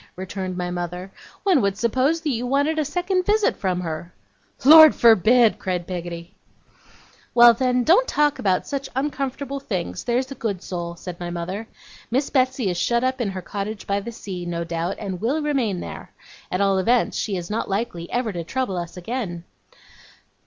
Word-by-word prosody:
returned 185 0 -5
my 180 -1 -3
mother. 180 +2 -5 0.3
'One 370 -9 +4
would 200 -1 0
suppose 260 +9 +1
you 245 -4 -1
wanted 285 +4 +1
a - - +2
second 360 +5 0
visit 420 +2 +2
from 185 -2 -1
her.' 165 0 -5 0.5
'Lord 315 +2 +10
forbid!' 230 +1 +5
cried 180 -2 -2
Peggotty. 175 0 -6 1.0
'Well 240 0 +9
then, 250 +1 +1
don't 385 - +4
talk 295 -1 +1
about 185 -2 +1
such 275 -1 -4
uncomfortable 275 0 -3
things, 190 -10 -4
there's 255 +2 -1
a - - -2
good 205 -8 -4
soul,' 170 -1 -5
said 175 0 -8
my 175 -1 -4
mother. 185 +6 -5 0.4
'Miss 265 +4 0
Betsey 255 -4 +1
is 175 - -4
shut 235 +4 +1
up 260 0 0
in 220 - 0
her 190 -1 -6
cottage 205 +3 -5
by 200 0 0
the 225 +4 -7
sea, 190 -5 -7
no 170 -1 -3
doubt, 170 +2 -3
and 190 -4 -5
will 260 +8 0
remain 250 -11 0
there. - - -8 0.4
At 180 - 0
all 195 -1 +3
events, 240 +6 +2
she 200 -4 -2
is 175 +2 -6
not 220 - -2
likely 195 -4 -3
ever 240 -2 -1
to 170 -1 -4
trouble 220 +1 -2
us 175 +1 -6
again. 180 -3 -4
215 Hz, 180 wpm, -23 LUFS, 180-260 Hz, 1.0 s, Lord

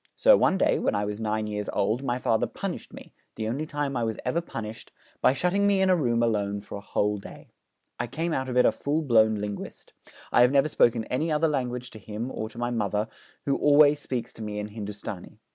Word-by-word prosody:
So - - +6
one 190 - +3
day, - - +2
when - - 0
I 105 - 0
was 105 +1 -4
nine 110 0 -1
years 105 -1 -4
old, 110 +5 +1
my 125 -3 -1
father 115 -3 +1
punished - - -5
me - - -12 0.2
the 110 - -3
only 140 +7 -2
time 145 -2 -2
I 120 - 0
was 110 -1 -2
ever 170 - +1
punished 110 -8 -7 0.3
by - - +5
shutting 180 +8 +1
me 200 -1 +3
in 190 0 +4
a - - +5
room 120 -7 +1
alone 100 -3 0
for - - -12
a 100 - -6
whole 105 0 0
day. - - -12 0.5
I - - -1
came 160 +7 -2
out 130 -2 -2
of 125 - -2
it 125 - +6
a - - +5
full 150 +3 -1
blown 110 -5 +4
linguist. 105 -1 -6 0.4
I - - +5
have 125 +1 +6
never 140 +2 +3
spoken 115 -5 +3
any 155 +6 -1
other 155 +2 +2
language 125 -4 -2
to 110 - -10
him, 110 +5 -5
or 110 - -4
to 115 - -16
my 120 0 -1
mother, 105 -1 -1 0.4
who 140 - +1
always 145 0 +5
speaks 125 -5 -4
to - - -11
me 105 -1 -4
in 105 0 -4
Hindustani. 105 -3 -7
120 Hz, 230 wpm, -26 LUFS, 105-145 Hz, 0.5 s, So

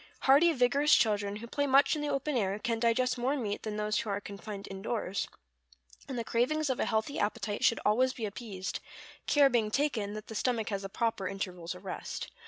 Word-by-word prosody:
Hearty, 290 +6 +6
vigorous 280 +2 +4
children, 205 -3 +1
who 215 +3 -7
play 285 +4 -1
much 275 +3 +5
in 300 - -3
the 295 - -1
open 275 +1 -1
air, 200 -4 +1
can 230 +1 -1
digest 245 +2 +2
more 265 +4 +1
meat 210 -5 -3
than 215 -1 -4
those 210 0 0
who 225 - -4
are 200 0 -1
confined 200 0 -8
indoors; 195 0 -2 0.8
and 260 - -3
the 235 - -1
cravings 265 +6 +1
of 255 - -3
a - - +2
healthy 220 +5 -1
appetite 205 0 -1
should 230 - +4
always 250 +5 +4
be 235 -4 -4
appeased, 200 -3 -5 0.5
care 290 -2 +6
being 235 -5 +1
taken 225 -5 0
that 215 - -7
the - - -8
stomach 225 0 0
has 200 -2 -2
the 195 - -6
proper 225 -2 -1
intervals 180 -3 -4
of - - -13
rest. - - -5
225 Hz, 205 wpm, -31 LUFS, 205-260 Hz, 0.8 s, Hearty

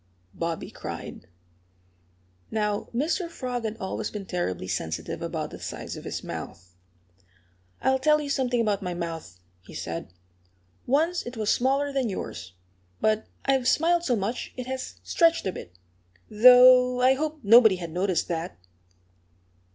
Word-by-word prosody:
Bobby 165 -1 -4
cried. - - -8 1.2
Now, 210 -1 -1
Mr. 325 +8 -1
Frog 250 -6 -4
had 220 0 -3
always 190 -4 -4
been 205 -2 -7
terribly 95 - -3
sensitive 85 -3 -4
about - - -4
the - - -9
size - - -6
of - - -10
his - - -5
mouth. 90 -1 -8 1.1
"I'll 265 0 +3
tell 300 +3 +4
you 295 - -4
something 250 -3 0
about 210 -3 +1
my 180 -2 -4
mouth," 165 - -6 0.2
he 90 - -14
said. 85 0 -5 0.8
"Once 320 +7 +2
it 240 0 -7
was 215 -1 +1
smaller 275 +3 +1
than 265 -4 0
yours. 90 - -6 0.5
But 215 0 +1 0.2
I've 265 -2 +2
smiled 335 +5 +3
so 255 -8 +1
much 215 +3 -4
it 250 - -4
has 260 0 -5
stretched 335 -1 +2
a 190 - 0
bit, 90 - -10 0.5
though 250 +2 +7
I 255 +1 +5
hoped 305 +1 -3
nobody 220 -1 +7
had 170 -3 -7
noticed 180 +1 0
that." 170 +1 -3
235 Hz, 145 wpm, -26 LUFS, 180-265 Hz, 1.2 s, though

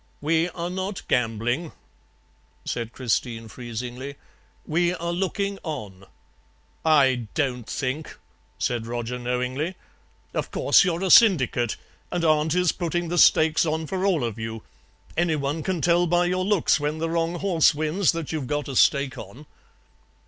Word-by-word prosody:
"'We 160 +3 +1
are 175 +1 -5
not 190 +1 -4
gambling,' 120 +6 0 0.9
said 115 -1 -3
Christine 115 -2 -2
freezingly; 125 +4 -6 0.5
'we 175 +3 +1
are 170 0 -3
looking 195 +2 -2
on.' 105 - -7 0.8
"'I 135 -7 +3
DON'T 125 -5 -1
think,' 140 +3 -4 0.4
said 115 -2 -2
Roger 120 +1 -4
knowingly; 125 +7 -2 0.6
'of - - -2
course - - +4
you're 180 -1 -1
a 190 - +1
syndicate 130 - +5 0.4
and 175 -1 -1
aunt 155 +1 +2
is 180 -2 +3
putting 175 -1 -2
the 175 0 0
stakes 160 0 +5
on 160 0 -1
for 185 +4 -3
all 185 -8 +2
of 115 -2 -3
you. 110 0 -5 0.5
Anyone 155 -3 0
can 180 -1 -2
tell 175 +1 +3
by 175 +1 +2
your 185 +1 0
looks 195 -6 +2
when 150 +2 -2
the 165 +1 -2
wrong 165 +1 -1
horse 175 -4 +3
wins 155 +4 +1
that 165 -3 -5
you've 155 -5 -3
got 145 +1 -2
a 135 - -5
stake 140 0 +3
on.' 115 +9 -11
155 Hz, 150 wpm, -24 LUFS, 125-175 Hz, 0.9 s, syndicate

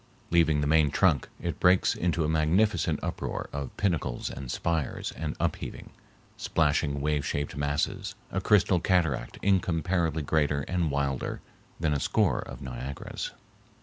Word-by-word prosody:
Leaving 80 -3 +4
the - - +1
main 75 0 +4
trunk, 80 -3 +2
it - - -4
breaks 90 +1 +4
into 85 -1 0
a - - 0
magnificent 80 +7 +2
uproar - - -3
of 70 -2 -3
pinnacles 80 -11 -1
and 65 -1 -7
spires 80 -5 -1
and 75 -2 -4
up - - 0
heaving, - - -8 0.5
splashing 75 -2 +1
wave 75 0 +1
shaped 70 0 -2
masses, 70 0 -1 0.2
a 95 - -1
crystal 95 -2 +4
cataract 80 -9 +1
incomparably 85 -4 +1
greater 75 -1 +1
and 85 +1 -1
wilder 70 -2 -1 0.4
than 80 -2 +1
a 70 - 0
score 95 - +2
of - - -7
Niagaras. 65 +1 -5
80 Hz, 145 wpm, -28 LUFS, 70-85 Hz, 0.5 s, Leaving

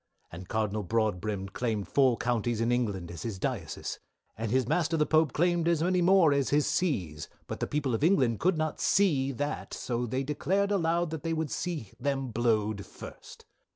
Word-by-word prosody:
"And 90 +2 -9
Cardinal 110 -1 -1
broadbrim 105 -1 -1
claimed 110 -1 -2
four 130 -4 +3
counties 120 -1 0
in 115 +1 +1
England 100 -8 -1
as 85 - -8
his 110 -4 -4
dioces, 100 - -4 0.4
and 115 +1 -3
his 130 +1 +1
master 165 +1 +1
the 150 - +3
Pope 155 -3 +3
claimed 175 +2 +1
as 170 -2 +2
many 180 +1 +2
more 175 -4 +5
as 140 -2 +1
his 145 0 +3
sees, 90 - -1 0.2
but - - -6
the - - -1
people 145 -4 -1
of 115 - -1
England 135 - +3
could 180 -1 +2
not 155 -1 -2
see 145 -9 +3
that, 145 +4 -4
so 120 0 -2
they 130 +4 -1
declared 190 +8 0
aloud 170 -3 +1
they 160 +1 -3
would 160 -3 -2
see 160 - -3
them 135 0 -1
blowed 110 -3 +1
first. - - -12
130 Hz, 185 wpm, -29 LUFS, 110-160 Hz, 0.4 s, more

